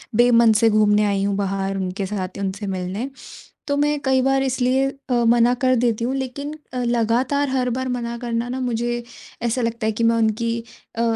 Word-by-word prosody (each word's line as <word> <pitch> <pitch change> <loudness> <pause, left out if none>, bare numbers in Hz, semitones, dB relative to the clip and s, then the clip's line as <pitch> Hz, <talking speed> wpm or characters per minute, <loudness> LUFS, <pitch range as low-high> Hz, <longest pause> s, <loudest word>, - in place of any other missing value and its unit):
बेमन 235 -1 +5
से 225 +1 +4
घूमने 210 -1 +3
आई 200 -1 0
हूँ 200 0 0
बाहर 195 0 -2
उनके 190 +1 -3
साथ 190 -1 -4
या 200 - -4
उनसे 200 +2 -3
मिलने। 190 +7 -3 0.6
तो 285 - 0
मैं 295 +1 +1
कई 265 -1 +3
बार 270 +1 +2
इसलिए 260 0 +1 0.2
अ, 240 -1 +2
मना 240 +1 +4
कर 255 0 +4
देती 235 -1 +1
हूँ 255 +3 -1
लेकिन 270 +3 -4 0.2
अ, 255 - -4
लगातार 240 +5 +1
हर 255 -1 0
बार 260 +2 -2
मना 235 -1 -3
करना 235 0 -2
ना 255 +1 -3
मुझे 240 -1 -1 0.4
ऐसा 235 +1 0
लगता 230 -1 -2
है 220 - +1
कि 230 +2 -1
मैं 230 0 +4
उनकी 225 +1 +1 0.4
अ, 230 - 0
235 Hz, 200 wpm, -21 LUFS, 210-255 Hz, 0.6 s, बेमन